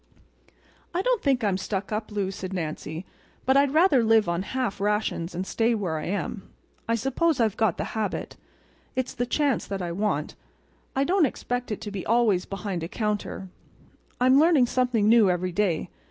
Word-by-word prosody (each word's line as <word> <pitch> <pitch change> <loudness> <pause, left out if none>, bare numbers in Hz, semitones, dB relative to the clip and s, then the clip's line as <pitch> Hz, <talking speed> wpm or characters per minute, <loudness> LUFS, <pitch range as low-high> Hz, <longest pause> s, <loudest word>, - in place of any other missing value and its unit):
"I 365 - +1
don't - - +1
think 265 -4 +1
I'm 200 -3 +2
stuck 195 +1 -3
up, 215 +1 -3
Lou," 200 -2 -1
said 185 0 -6
Nancy, 160 0 -4 0.4
"but 265 - +3
I'd 280 0 +4
rather 310 -5 +4
live 220 -2 +4
on 170 +1 0
half 235 -1 -3
rations 205 -4 -1
and 185 +2 -2
stay 230 +3 +1
where 175 -7 -2
I - - -5
am. 195 +1 -4 0.4
I 230 - +2
suppose 270 +6 +1
I've 220 -3 +2
got 220 -6 +1
the - - -2
habit. 215 -3 -3 0.6
It's 260 0 -2
the 245 - -2
chance 280 -2 +1
that 195 -2 -3
I 170 - -3
want. 175 -5 -1 0.6
I 270 - +2
don't 355 0 +3
expect 245 -3 -4
to 210 - -6
be 195 -2 -4
always 220 -5 +2
behind 195 -3 -4
a 165 - -3
counter. 210 -2 -3 0.7
I'm 255 +2 +5
learning 310 -5 +5
something 245 -4 +1
new 220 -3 +6
every 180 0 0
day. 180 -3 0
215 Hz, 180 wpm, -26 LUFS, 190-250 Hz, 0.7 s, new